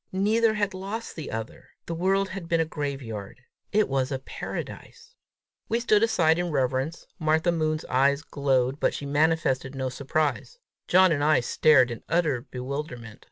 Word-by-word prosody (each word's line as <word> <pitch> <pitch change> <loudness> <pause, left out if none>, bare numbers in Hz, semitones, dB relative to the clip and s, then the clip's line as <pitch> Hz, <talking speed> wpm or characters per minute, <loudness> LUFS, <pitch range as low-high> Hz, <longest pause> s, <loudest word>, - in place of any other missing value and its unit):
Neither 215 +4 +2
had 205 -2 0
lost 200 +5 -6
the 155 - -6
other! 110 0 -6 0.2
The 170 - -4
world 195 +3 +1
had 185 -3 -7
been 165 -1 +2
a 165 - +2
graveyard; 130 -9 -5 0.3
it 215 0 +3
was 135 0 -1
a 135 - 0
paradise! 455 - -8 0.6
We 230 - +1
stood 215 -3 +3
aside 175 -8 +3
in 175 0 -1
reverence. 135 +2 -1
Martha 160 +2 +2
Moon's 155 -1 -1
eyes 140 +3 +2
glowed, 135 -2 0
but - - +1
she 145 - -5
manifested 145 -2 +1
no 130 -1 -2
surprise. 145 - -2 0.3
John 185 0 +5
and 145 -2 +1
I 155 +1 +4
stared 130 +1 +4
in 115 - -6
utter 155 -8 +1
bewilderment. 125 -3 -6
155 Hz, 160 wpm, -26 LUFS, 135-180 Hz, 0.6 s, John